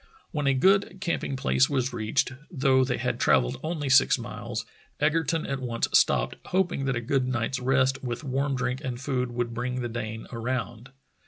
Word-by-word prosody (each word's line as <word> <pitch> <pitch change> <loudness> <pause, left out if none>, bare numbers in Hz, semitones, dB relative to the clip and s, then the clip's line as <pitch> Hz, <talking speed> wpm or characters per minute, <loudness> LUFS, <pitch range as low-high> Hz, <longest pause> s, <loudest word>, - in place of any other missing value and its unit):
When 150 -3 -1
a 135 - +3
good 190 +6 +3
camping 170 -7 -2
place 135 0 +2
was 130 -3 0
reached, 120 +3 0 0.2
though 135 -5 +3
they 125 -1 -1
had - - -2
travelled - - +2
only 155 -3 -3
six 135 +1 +5
miles, - - -5 0.3
Egerton 160 +1 +1
at 135 -1 -3
once 120 -2 -1
stopped, - - +3
hoping 175 -7 0
that 135 -1 0
a 120 - -2
good 130 +2 0
night's 125 +1 -1
rest 130 +1 +1
with 120 +2 -4
warm 135 0 -1
drink 125 +1 -2
and 125 -3 -4
food 130 -2 -1
would 120 -1 -2
bring 125 +2 -2
the 120 - -3
Dane 110 -1 -5
around. 120 0 -4
130 Hz, 180 wpm, -27 LUFS, 120-140 Hz, 0.3 s, six